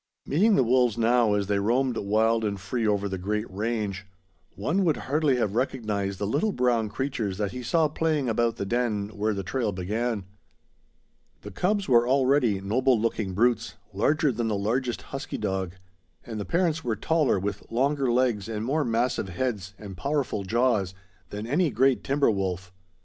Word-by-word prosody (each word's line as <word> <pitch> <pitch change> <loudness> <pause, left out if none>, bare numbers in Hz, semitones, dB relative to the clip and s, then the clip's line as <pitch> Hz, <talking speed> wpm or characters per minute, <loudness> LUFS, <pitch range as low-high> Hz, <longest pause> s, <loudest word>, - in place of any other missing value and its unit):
Meeting 200 +9 +3
the 130 - +4
wolves 125 -2 +2
now, 115 -2 +3
as 100 -1 0
they 100 0 0
roamed 120 +4 +1
wild 110 +2 +1
and 100 -2 -2
free 110 +5 -2
over 100 -1 +1
the 95 -1 -4
great 105 +4 -2
range, 100 -1 -3 0.5
one 165 - 0
would 160 -5 +2
hardly 145 -1 +1
have 110 -5 0
recognized 105 -6 -1
the 100 - -2
little 145 - +1
brown 120 - +1
creatures 115 -7 -3
that 105 -2 -1
he 125 - -6
saw 160 +6 +2
playing 155 -2 0
about 115 0 +1
the 100 - -4
den 110 -2 -1
where 105 0 -1
the 100 - -3
trail 115 +2 -1
began. 105 +3 -2 1.2
The 105 - -9
cubs 200 - 0
were 120 -2 +4
already 130 -5 +3
noble 120 +5 +2
looking 110 -4 -1
brutes, 115 +1 +1 0.2
larger 145 +8 +2
than 115 -1 -2
the 110 - 0
largest 120 +4 -1
husky 135 - -6
dog; 95 -3 -2 0.5
and 110 -2 -5
the 100 - -4
parents 165 -2 0
were 115 -3 -1
taller, 155 +3 +1
with 100 +1 -4
longer 135 +2 +1
legs 120 -5 +1
and 110 0 -3
more 150 +5 +1
massive 115 -4 0
heads 100 -1 -3
and 100 -3 -9
powerful 140 -1 -1
jaws, 105 -3 +1 0.3
than 105 +1 -5
any 155 +8 +2
great 135 0 +2
timber 140 -2 +2
wolf. 95 -2 -3
115 Hz, 175 wpm, -26 LUFS, 100-130 Hz, 1.2 s, the